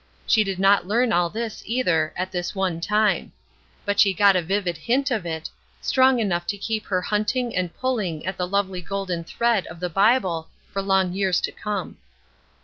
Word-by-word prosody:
She 215 - +4
did 195 -2 -3
not 195 -1 +4
learn 230 +3 +2
all 175 -1 +2
this, 225 +2 -5
either, 180 -10 +1
at 185 +1 -3
this 180 +2 -3
one 185 -4 -1
time; 210 +2 +1 0.5
but 205 0 0
she 195 -2 +5
got 200 +1 +5
a 180 - +3
vivid 185 0 -1
hint 255 - 0
of 210 -8 -1
it, 160 -1 -4 0.3
strong 260 -1 +3
enough 175 -6 -1
to 205 - -2
keep 215 +2 -3
her 185 -2 0
hunting 220 +4 -1
and 180 -2 -1
pulling 210 -12 -2
at 190 0 -2
the 180 -1 -2
lovely 190 -1 -1
golden 185 -2 -3
thread 235 +3 0
of 165 - -10
the 180 0 -3
Bible 195 -4 +2 0.2
for 195 - -2
long 190 -2 +2
years 190 -2 +1
to - - -2
come. 205 -3 -4
195 Hz, 190 wpm, -23 LUFS, 180-215 Hz, 0.5 s, she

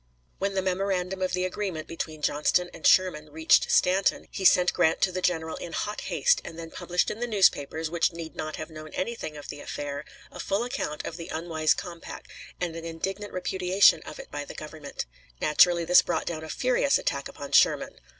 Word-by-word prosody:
When 195 0 -1
the 190 - +1
memorandum 190 0 -1
of 185 0 0
the 180 0 +1
agreement 185 -4 -4
between 155 -2 -6
Johnston 175 +4 +1
and - - 0
Sherman 165 -5 +3
reached 160 +1 +3
Stanton, 185 +2 +2
he 195 - -5
sent 180 -1 +5
Grant 160 - +2
to 190 - +3
the 185 0 -3
general 160 -3 0
in 170 - -7
hot 210 0 -3
haste, 485 - +2
and 165 - -9
then 165 -1 -8
published 180 0 -1
in 215 - -6
the 240 - -1
newspapers, 165 -7 +2
which 170 +1 +2
need 165 -1 -8
not 155 0 -4
have 155 +1 -7
known 155 0 -9
anything 185 -7 -4
of 145 - -10
the 145 - -6
affair, 145 0 -5 0.3
a - - -11
full 200 +4 0
account 245 - -4
of 165 - -5
the 165 - -7
unwise 160 -1 0
compact, 170 -2 -8 0.3
and 175 -2 -2
an 165 - -6
indignant 190 +5 -4
repudiation 185 +1 +3
of - - -9
it - - -10
by 145 0 -4
the - - -10
Government. 155 -1 -7 0.3
Naturally 170 +2 +4
this 180 +2 +7
brought 175 - -2
down 160 -2 -4
a 160 - -8
furious 255 - +2
attack - - -2
upon - - -9
Sherman. - - +3
175 Hz, 200 wpm, -27 LUFS, 160-190 Hz, 0.3 s, this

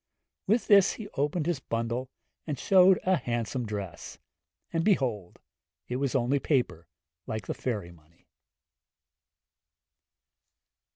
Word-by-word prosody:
With 220 +4 +2
this 200 -1 +6
he 220 - -8
opened 150 +2 -1
his 170 -4 0
bundle, 115 +1 -3 0.4
and 150 -3 -2
showed 185 +4 +5
a 185 0 +3
handsome 120 -1 -3
dress; 100 -5 -6 0.6
and 165 0 +1
behold, 125 - 0 0.5
it 125 - -2
was 140 0 -1
only 135 +2 +2
paper, 125 - 0 0.4
like 110 -3 -4
the - - -3
fairy 105 -9 -4
money. 85 0 -23
130 Hz, 115 wpm, -28 LUFS, 110-165 Hz, 0.6 s, this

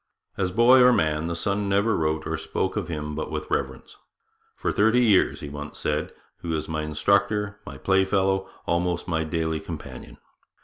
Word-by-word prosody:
As 95 -2 -1
boy 120 +6 +6
or 125 0 +7
man, 80 -5 +1
the 85 - -2
son 100 +3 -1
never 100 +3 +2
wrote 80 0 -1
or - - -2
spoke - - -2
of - - -2
him 75 -2 -4
but 80 - -4
with 75 0 -5
reverence. - - -3 0.6
'For - - -2
thirty 110 +4 +3
years,' 100 -5 +3
he 75 - -6
once 75 0 -8
said, - - -2 0.3
'he - - -7
was 80 -2 -2
my 80 -1 -2
instructor, 100 +6 0
my - - -8
play 95 0 +2
fellow, 95 0 0 0.2
almost 85 0 -1
my 80 -2 0
daily 80 0 -2
companion. 75 -7 -9
85 Hz, 180 wpm, -25 LUFS, 80-100 Hz, 0.6 s, or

